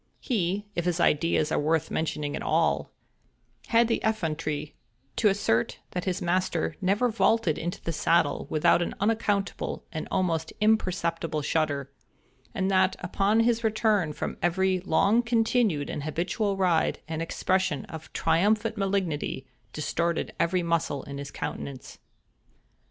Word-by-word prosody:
He—if 205 - -2
his 175 -1 0
ideas 155 -1 +2
are - - +2
worth 160 +1 0
mentioning 150 -2 -2
at - - -5
all—had 230 0 -1
the 230 - 0
effrontery 155 -8 -2 0.4
to 220 - +4
assert 195 - +1
that 180 - -3
his 185 -2 -1
master 175 -1 0
never 200 +6 +2
vaulted 225 -6 +2
into 175 +2 -4
the 165 - -2
saddle 165 -1 +1
without 155 +2 +3
an 175 - -2
unaccountable 205 -2 -1
and 160 -2 -4
almost 165 -4 0
imperceptible 175 -7 +1
shudder, 145 -3 -1 0.6
and 190 0 0
that, 190 0 +3
upon 200 +5 +2
his 230 0 +2
return 215 -6 +2
from - - -4
every 185 +2 +2
long 195 +6 +3
continued 225 - +1
and - - -4
habitual 180 +7 -1
ride, 180 -4 +2
an 160 0 -3
expression 185 -3 0
of 160 -1 -10
triumphant 210 +7 +1
malignity 190 -9 -1 0.3
distorted 170 +4 -1
every 175 +1 +1
muscle 165 -5 0
in 140 0 -7
his 140 0 -6
countenance. 135 -2 -6
175 Hz, 130 wpm, -27 LUFS, 160-205 Hz, 0.6 s, to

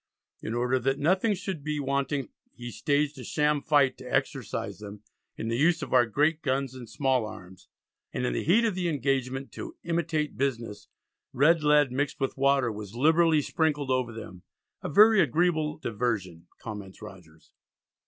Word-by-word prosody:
In 110 - -4
order 125 +2 +1
that 135 +2 0
nothing 185 +8 +2
should 185 -5 -5
be 150 0 -2
wanting 140 -2 -1 0.3
he 120 0 -7
staged 145 +3 0
a - - -7
sham 150 -1 +1
fight 145 -4 +2
to 125 -1 -9
exercise 130 - -2
them 105 0 -10 0.3
"in 110 - -4
the 115 +1 -1
use 165 +6 +2
of - - -6
our 125 -2 +5
great 150 +7 +1
guns 135 0 -1
and 125 -3 -10
small 130 -4 +1
arms," 95 -3 -12 0.4
and - - -2
in - - -1
the - - -2
heat 215 +9 +4
of 220 - +1
the 180 -1 -1
engagement 135 -2 -1
"to 340 -1 -8
imitate 165 -3 -1
business," 120 -6 -3 0.5
red 160 +5 +4
lead 150 -3 +4
mixed 140 +2 -2
with 135 - -2
water, 135 -3 +2
was 105 0 -8
liberally 160 +3 +4
sprinkled 150 -4 0
over 130 -2 0
them; 100 -5 -9 0.4
"a - - -4
very 215 +6 +6
agreeable 155 0 +1
diversion," 100 - -3
comments 100 -4 -8
Rogers. 85 -6 -14
135 Hz, 170 wpm, -27 LUFS, 120-155 Hz, 0.5 s, very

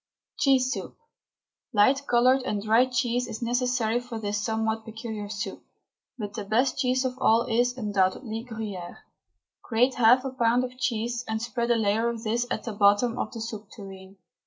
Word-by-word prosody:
CHEESE 260 -2 +3
SOUP. - - -7 0.8
Light 265 +7 +3
coloured 250 +2 +4
and 210 -5 -3
dry 225 +4 +4
cheese 245 0 0
is 225 0 -6
necessary 240 -1 +1
for 245 -2 -7
this 205 -1 -2
somewhat 220 0 -1
peculiar 220 -2 -6
soup, 200 -2 -5 0.5
but 205 -3 -5
the 210 - -4
best 245 +7 +1
cheese 260 0 +1
of 255 -1 -2
all 230 -2 +4
is, 245 +1 +1
undoubtedly, 210 +1 -1
Gruyere. 215 -7 -7 0.6
Grate 245 +3 +2
half 245 +2 +5
a 265 - -2
pound 245 -1 +2
of 255 0 -6
cheese 240 -1 -1
and 220 0 -2
spread 235 +1 -2
a 235 - +4
layer 220 +1 +1
of 230 -1 -5
this 235 +2 0
at - - -3
the 225 - -5
bottom 205 +4 +3
of - - -2
the 230 -3 -7
soup 215 -2 -6
tureen. 195 -2 -11
230 Hz, 175 wpm, -26 LUFS, 215-250 Hz, 0.8 s, half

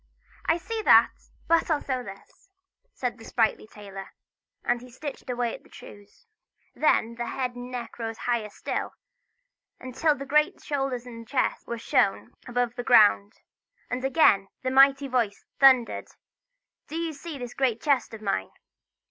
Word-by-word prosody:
"I 325 - +3
see 440 +6 -4
that, - - +6 0.4
but 335 +1 +3
I'll 310 -3 +2
sew 260 -3 -3
this!" 195 - -13 0.4
said 250 -3 -4
the - - -12
sprightly 225 -2 0
tailor; 195 -2 -10 0.5
and 240 0 0
he 250 - -12
stitched 275 +2 -8
away 245 -1 -1
at - - -9
his - - -23
trews. 205 - -14 0.5
Then 235 -6 +2
the 240 0 -5
head 255 -1 -3
and 245 0 -8
neck 245 -1 -7
rose 225 -1 -4
higher 235 -3 -1
still, - - -4 0.8
until 260 +4 0
the 275 - -7
great 300 +2 +2
shoulders 270 -4 -3
and 230 -2 -10
chest 265 0 -1
were 235 - -4
shown 225 0 +1 0.2
above 245 -1 -1
the 245 0 -5
ground. 210 -3 +5 0.6
And 250 +1 -2
again 265 -9 +4 0.2
the 255 - -1
mighty 275 +1 +5
voice 235 -6 -1
thundered: 260 -3 +5 0.8
"Do 310 - -8
you 330 -1 -2
see 305 +1 -8
this 245 -2 -7
great 250 -4 0
chest 275 -3 +1
of 215 - -12
mine?" 95 - -1
245 Hz, 160 wpm, -26 LUFS, 230-275 Hz, 0.8 s, that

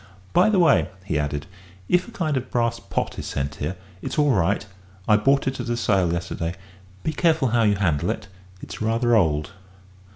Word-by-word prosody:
"By 180 +5 +5
the 210 - +2
way," 170 -5 +4 0.2
he 80 -6 0
added, 75 0 -2 0.4
"if 180 0 +2
a - - -10
kind 160 -9 -1
of 130 -1 -3
brass 115 -1 0
pot - - -3
is - - -5
sent 70 +1 -3
here, 75 +6 -3 0.3
it's - - -5
all 145 -1 +4
right. 100 -2 +1 0.4
I 105 - +6
bought 135 +6 +3
it 135 -1 -2
at - - -4
a 120 - 0
sale 95 -7 +2
yesterday. 85 0 -3 0.5
Be 155 - -1
careful 160 -7 +2
how 120 +1 +2
you 105 -2 +3
handle 85 -5 0
it 110 - -3 0.4
it's - - -8
rather 115 +2 +2
old." 75 -7 +2
110 Hz, 195 wpm, -23 LUFS, 85-135 Hz, 0.5 s, I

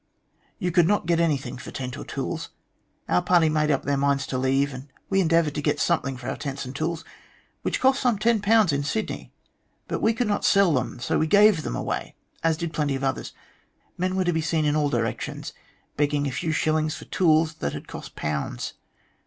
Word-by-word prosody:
You 180 - -1
could 170 -1 +4
not 205 -2 +2
get 170 -1 +2
anything 140 -7 0
for - - -8
tents 125 -2 -5
or - - -7
tools. - - -4 0.6
Our 90 - +3
party 170 -3 +4
made 155 0 +1
up 140 -3 +1
their 140 0 0
minds 140 -1 +1
to 130 - -3
leave, 135 +2 +1
and 130 +2 -9 0.2
we 195 0 +4
endeavoured 165 -3 +2
to 150 - -2
get - - 0
something 140 -6 0
for 120 0 -8
our - - -3
tent& 140 -2 -4
and 130 +2 -8
tools, 160 +2 -2 0.6
which - - -1
cost 265 +1 +3
some 245 -5 +2
.10 215 -4 +3
in 140 - +1
Sydney, 215 +9 -3 0.6
but - - -3
we 225 - +3
could 245 +2 0
not 205 - 0
sell 195 -4 +4
them, 125 -2 -1
so - - 0
we 160 - +2
gave 205 -1 +5
them - - -4
away, - - -3 0.3
as 165 -1 +2
did 170 0 -4
plenty 145 -3 0
of 135 - -4
others. 135 -1 -2 0.6
Men 185 +1 -1
were 190 -1 +1
to 175 - +2
be 160 - 0
seen 155 0 0
in 150 0 +2
all 150 -1 +2
directions 115 -4 -3 0.4
begging 145 0 +1
a 140 - -1
few 160 +5 -2
shillings 155 0 +1
for - - -10
tools 160 -2 +3
that 70 - -1
had - - -7
cost - - -9
pounds. 75 -5 -3
155 Hz, 210 wpm, -25 LUFS, 140-175 Hz, 0.6 s, gave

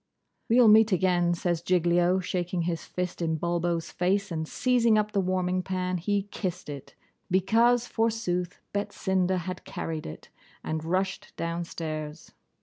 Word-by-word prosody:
'We'll 235 0 +6
meet 220 +1 +7
again,' 175 -1 +2
says 170 -1 -1
Giglio, 175 +1 +2
shaking 180 -1 -2
his 165 -2 -2
fist 180 -1 -4
in 160 -1 0
Bulbo's 170 0 -1
face; 195 +2 0
and 160 -1 -3
seizing 235 -1 +3
up 210 0 +1
the 200 - +1
warming 185 0 0
pan, 185 -1 -2
he 200 +3 0
kissed 180 -5 -4
it, 140 -2 -8 0.3
because, 230 +6 +3
forsooth, 220 -7 -1
Betsinda 190 -2 0
had 180 +1 -5
carried 160 -1 -5
it, 75 - -10 0.3
and 155 0 -3
rushed 185 +3 -2
downstairs. 165 -2 -4
180 Hz, 140 wpm, -27 LUFS, 170-195 Hz, 0.3 s, meet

